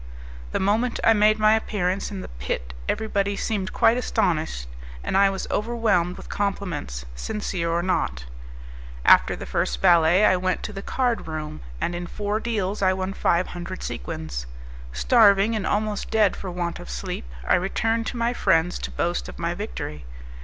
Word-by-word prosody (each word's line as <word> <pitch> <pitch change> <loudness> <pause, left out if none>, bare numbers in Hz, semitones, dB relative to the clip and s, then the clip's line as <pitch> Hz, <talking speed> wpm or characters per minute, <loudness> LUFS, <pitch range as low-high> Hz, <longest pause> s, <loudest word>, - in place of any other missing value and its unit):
The - - 0
moment 220 +5 +1
I 225 - +6
made 215 0 +4
my 215 0 +5
appearance 200 -3 -1
in 195 -2 -6
the - - -7
pit 60 0 -5 0.2
everybody 200 -2 0
seemed 200 -2 -2
quite 230 - +4
astonished, 160 - 0 0.4
and - - -2
I 195 0 +6
was 195 -1 -3
overwhelmed 210 -6 +1
with - - -10
compliments, 180 - -3
sincere 170 - -3
or 170 +1 0
not. 60 - -1 0.8
After - - +6
the - - -7
first 60 0 -1
ballet 170 - +5
I 185 - +5
went 185 0 -1
to 210 - -5
the 195 - -5
card 245 -1 -1
room, 155 - -5 0.2
and 175 - -1
in 175 0 -4
four 210 +3 -2
deals 210 -4 -2
I 190 -1 +4
won 190 +1 -3
five 175 -1 +1
hundred 175 +1 -6
sequins. - - -5 0.4
Starving, 195 - +4
and 210 -3 -2
almost 210 0 -1
dead 215 -3 +3
for 190 - -6
want 175 -1 -3
of - - -10
sleep, - - -5 0.2
I - - +4
returned 225 +5 +1
to - - -4
my 235 +1 +1
friends 175 -5 +2
to - - -4
boast 175 +1 -2
of - - -10
my 170 0 -1
victory. 175 - -6
190 Hz, 175 wpm, -24 LUFS, 170-210 Hz, 0.8 s, I